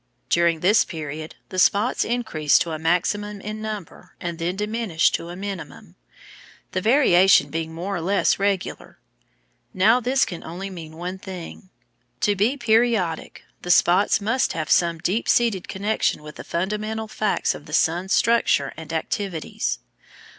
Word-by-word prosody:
During 170 -2 +3
this 205 +5 +5
period 155 -1 -7
the 185 - -3
spots 205 +6 +3
increase 220 -11 +1
to 170 - -1
a 155 - -4
maximum 200 +5 0
in 215 +2 -6
number 215 -4 -7
and 170 -1 -5
then 175 +2 -1
diminish 210 -4 +1
to 170 - -3
a 175 - -7
minimum, 180 - -7 0.8
the 185 - -1
variation 195 -6 +5
being 160 0 -3
more 180 +4 -4
or - - -4
less 195 +4 +2
regular. 200 -1 -2 0.8
Now 215 +6 +5
this 255 +2 +2
can 175 - -7
only 185 +4 -6
mean 160 -3 -9
one 180 +2 -5
thing. 185 0 -9 0.5
To 205 - +2
be 220 +8 +1
periodic 225 - +1 0.2
the 180 - -7
spots 180 +3 +4
must 225 +6 0
have 155 -1 -3
some 170 -1 +3
deep 185 +7 -1
seated 225 -6 +2
connection 200 -5 -1
with 150 0 -10
the - - -7
fundamental 210 +5 -3
facts 215 -1 0
of - - -11
the - - -11
sun's 175 +4 +1
structure 230 -13 +2
and 160 0 -9
activities. 165 +1 -2
190 Hz, 155 wpm, -23 LUFS, 165-215 Hz, 0.8 s, this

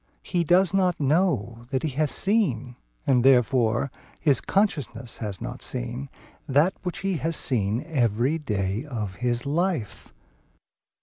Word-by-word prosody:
He 175 -2 0
does 180 +4 +3
not 185 -3 +2
know 135 - +1
that 130 -1 -1
he 160 - 0
has 145 +2 0
seen 135 - +1 0.3
(and 125 -3 +3
therefore 125 -1 +3
quoad - - -26
his 145 -4 +3
consciousness 130 - -1
has 105 -4 -4
not 125 +1 -6
seen) 125 +2 -3 0.4
that 145 +7 +3
which 180 -2 -4
he 195 -2 0
has 165 +1 -2
seen 115 -2 0
every 130 0 +1
day 105 -5 -2
of 110 -10 -5
his 120 +1 -1
life. 160 - -2
135 Hz, 140 wpm, -25 LUFS, 120-165 Hz, 0.4 s, does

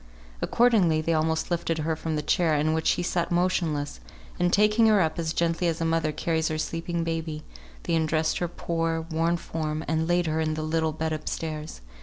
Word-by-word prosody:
Accordingly 210 -10 +3
they 165 +1 0
almost 160 +2 0
lifted 165 -1 0
her 160 +1 -1
from 160 0 -3
the 150 - -2
chair 160 +1 +2
in 155 +2 +1
which 160 0 0
she 175 - +2
sat 175 -1 -1
motionless, 170 - 0 0.4
and 175 0 +2
taking 210 +3 +4
her 215 -2 +5
up 160 -2 0
as 160 -1 -1
gently 170 +1 0
as 165 -1 -1
a 165 - 0
mother 165 -1 +1
carries 160 +1 -1
her 155 - -2
sleeping 165 +2 -2
baby, 160 -2 -3 0.4
they - - -2
undressed 160 -1 +1
her 175 - 0
poor, 165 -1 -2
worn 165 +2 +1
form, 155 -1 -4
and 160 0 0
laid 175 0 +2
her 160 0 0
in 155 -1 0
the 155 - -3
little 160 0 0
bed 160 +1 -2
up 155 0 -4
stairs. 155 - -5
160 Hz, 205 wpm, -26 LUFS, 155-170 Hz, 0.4 s, her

